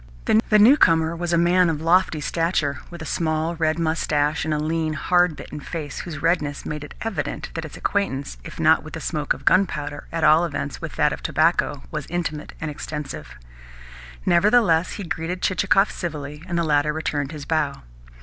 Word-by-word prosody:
The 215 - +6
newcomer 170 - +5
was 175 0 -3
a 170 - +3
man 175 +1 +4
of 155 -2 -1
lofty 165 -1 +2
stature, 155 -4 0
with 170 -2 -8
a - - -7
small 160 +1 -1
red 160 -1 0
moustache 160 -2 0
and 155 - -1
a 150 - +1
lean, 155 +1 -1
hard 175 +2 +2
bitten 150 - -8
face 150 -1 -6
whose 155 -5 -7
redness 150 -4 0
made 150 -1 -4
it 145 - -10
evident 225 -3 -3
that 165 -1 -4
its 155 - -9
acquaintance, 140 - -2
if - - -10
not - - +5
with - - -11
the - - -5
smoke - - -1
of - - -14
gunpowder, 150 -6 +1
at 165 -1 -2
all 155 +2 +6
events 145 -4 -4
with - - -6
that - - +2
of - - -7
tobacco, - - +1
was - - -4
intimate 160 -3 -4
and 155 -1 -3
extensive. 145 - -7 0.9
Nevertheless 180 -2 +4
he 205 - -6
greeted 170 +1 -4
Chichikov 195 +2 +3
civilly, 150 -4 -5
and 175 -2 -2
the 170 - +2
latter 150 -1 +2
returned 145 -2 -2
his 150 -3 -7
bow. 150 - -1
160 Hz, 185 wpm, -23 LUFS, 150-175 Hz, 0.9 s, The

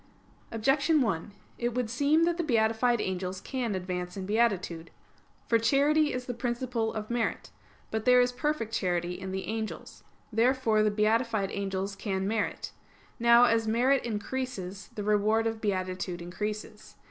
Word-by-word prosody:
Objection 270 +8 +2
1: 205 -6 -1 0.3
It 240 0 -1
would 250 -2 0
seem 285 +7 +2
that 340 0 +1
the 345 - 0
beatified 230 -2 +2
angels 185 -1 -3
can 240 -2 -3
advance 180 0 -4
in 190 - -4
beatitude. 190 -6 0 0.6
For 230 - +3
charity 290 +6 +3
is 250 0 -4
the 245 - -3
principle 240 -1 -2
of 215 0 -5
merit. 235 -2 -2 0.4
But 220 0 -2
there 250 0 +6
is 245 0 +3
perfect 250 -4 -2
charity 175 -4 0
in 190 0 -6
the 190 0 -3
angels. 220 0 -5 0.3
Therefore 230 -1 +3
the 215 - +3
beatified 215 -1 +1
angels 195 0 -3
can 195 -1 -2
merit. 215 0 -2 0.5
Now, 235 +1 +6
as 230 -2 +3
merit 250 +5 +3
increases, 210 -4 -4
the 210 - -4
reward 210 +2 +2
of 225 -1 -2
beatitude 185 -3 -2
increases. 210 +4 -6
220 Hz, 150 wpm, -29 LUFS, 195-245 Hz, 0.6 s, there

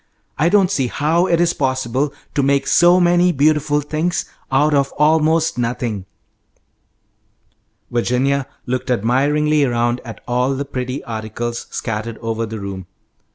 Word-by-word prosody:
I 160 +5 +2
don't 195 -1 +3
see 135 -9 0
how 160 +8 +1
it 170 -2 +2
is 175 0 +2
possible 130 +1 -1 0.2
to 140 - +1
make 140 0 +2
so 175 +1 +5
many 175 0 +4
beautiful 150 0 +2
things 155 +4 -2 0.3
out 145 +3 +3
of 140 -1 +2
almost 160 0 +2
nothing." 115 -5 -2 1.8
Virginia 130 +3 0 0.2
looked 130 0 -3
admiringly 145 +6 +2
around 120 -1 0
at 115 -3 -9
all 125 +2 +1
the 140 +2 -3
pretty 130 0 -4
articles 115 +1 -5
scattered 110 0 -4
over 115 0 -3
the 110 0 -6
room. 95 -2 -6
135 Hz, 135 wpm, -19 LUFS, 120-155 Hz, 1.8 s, so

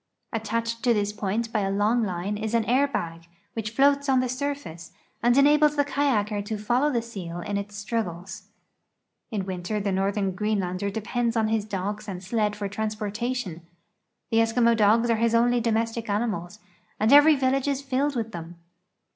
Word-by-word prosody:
Attached 230 +1 -2
to 240 -2 +4
this 205 0 0
point 210 +3 -2
b3' 205 -3 +1
a - - -1
long 210 +4 +2
line 190 +1 -2
is 220 +2 -2
an 230 -2 +2
air 260 +5 +3
bag, 165 -10 -4 0.3
which 220 -2 -3
floats 280 +4 +3
on 260 -1 +4
the 255 - +1
surface, 255 - -5 0.3
and 240 +2 +3
enables 295 +1 +5
the 285 -1 +2
ka3^aker 215 -8 0
to 215 +1 -4
follow 245 +8 +1
the 235 -3 0
seal 180 -7 -7
in 205 +1 -4
its 200 0 -4
struggles. 195 -4 -4 0.8
In 210 -6 -2
Avinter 185 +2 -3
the 200 - 0
northern 195 +1 0
Greenlander 200 -1 -1
depends 230 +3 -2
on 220 -1 +2
his 220 -2 0
dogs 210 +1 -4
and 185 -2 -6
sled 210 +1 0
for 205 -1 -3
transportation. 215 -1 -3 0.7
The 225 - +2
Eskimo 230 +1 +3
dogs 225 +2 +4
are 230 - +2
his 230 +1 +2
only 240 +1 +3
domestic 225 0 -1
animals, 205 -3 -2 0.4
and 220 +5 +4
every 295 +2 +8
village 265 0 +1
is 280 -1 -1
filled 275 +1 0
with 225 -2 -2
tliem. 170 -2 -8
220 Hz, 175 wpm, -25 LUFS, 200-240 Hz, 0.8 s, every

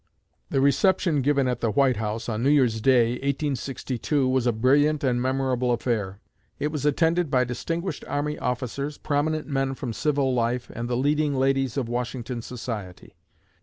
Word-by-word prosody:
The 135 - +1
reception 150 +2 +3
given 140 0 +2
at 125 -1 -2
the 115 - +1
White 130 +2 +2
House 110 +1 -3
on 110 -1 -2
New 135 - +3
Year's 125 -7 +3
day, 120 -1 +4
1862, 140 -1 -1
was 130 -1 +1
a - - +4
brilliant 145 +6 +2
and 125 -2 +1
memorable 130 -1 0
affair. 110 -5 -1 0.4
It 150 +1 -2
was 150 -1 -1
attended 165 +2 +2
by 130 -2 +3
distinguished 165 +9 -4
army 150 +1 -2
officers, 130 +4 -3
prominent 155 +1 -1
men 135 -2 -1
from 125 -3 -5
civil 140 0 +1
life, 120 0 -1
and 120 +1 -4
the 120 - 0
leading 145 +2 +1
ladies 135 -1 +1
of 130 -4 -1
Washington 120 0 -3
society. 115 -6 -7
130 Hz, 165 wpm, -25 LUFS, 120-145 Hz, 0.4 s, day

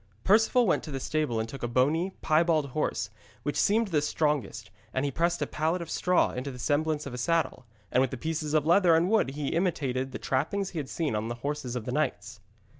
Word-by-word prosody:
Perceval 225 +4 +4
went 185 - +2
to - - -8
the 135 -2 -3
stable 150 -5 -1
and 110 - -2
took 135 +4 -9
a 120 - -1
bony, 145 +9 +2
piebald 155 -2 +2
horse, 120 -6 -2 0.3
which 145 - -2
seemed 220 +1 +2
the 155 -5 +2
strongest, 145 -8 -1 0.2
and 130 +2 +1
he 140 - -1
pressed 170 +4 0
a - - 0
pallet 160 +4 -1
of 170 -2 -7
straw 180 0 +2
into 130 +2 -4
the 130 - -8
semblance 150 +3 0
of 140 - -6
a 125 - -5
saddle, 165 -3 0 0.2
and 125 - +3
with 130 -1 -1
pieces 155 +1 -2
of 150 -1 +3
leather 170 0 +5
and 170 +4 +2
wood 220 -11 +3
he 140 +1 -3
imitated 135 -7 -1
the - - -5
trappings 185 +9 -1
he 170 - -4
had 140 - -5
seen 155 -9 -1
on 105 +1 -2
the 120 - -3
horses 145 -4 -3
of 120 -3 -4
the - - -3
knights. 150 +4 -2
150 Hz, 225 wpm, -28 LUFS, 130-165 Hz, 0.3 s, leather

